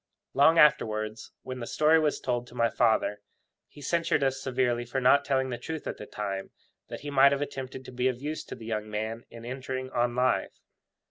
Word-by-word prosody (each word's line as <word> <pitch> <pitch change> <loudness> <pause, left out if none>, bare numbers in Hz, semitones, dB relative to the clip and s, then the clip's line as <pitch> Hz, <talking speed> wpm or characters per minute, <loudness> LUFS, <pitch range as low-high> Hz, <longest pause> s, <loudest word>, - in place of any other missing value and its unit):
Long 150 +5 +5
afterwards, 110 -8 +2
when 130 0 -6
the 115 - -5
story 155 +1 +4
was 150 -2 +1
told 120 -1 -2
to 120 - -14
my 115 -1 +2
father, 105 -2 +2 0.5
he 145 - -14
censured 165 0 +1
us 135 0 0
severely 125 -2 0
for 120 +3 -2
not 135 +2 +5
telling 130 -2 0
the 120 - -4
truth 160 +5 -6
at - - -4
the 105 - -9
time, 100 -2 -4 0.4
that - - -7
he 145 0 -6
might 140 0 +6
have 140 0 0
attempted 130 -2 -7
to - - -9
be 125 +1 0
of 125 -2 -1
use 150 +3 -4
to - - -7
the 115 - -11
young 110 -1 -3
man 110 +2 -4
in 115 0 -11
entering 130 +1 -5
on 120 -1 0
life. 125 +1 +1
130 Hz, 210 wpm, -28 LUFS, 115-140 Hz, 0.5 s, might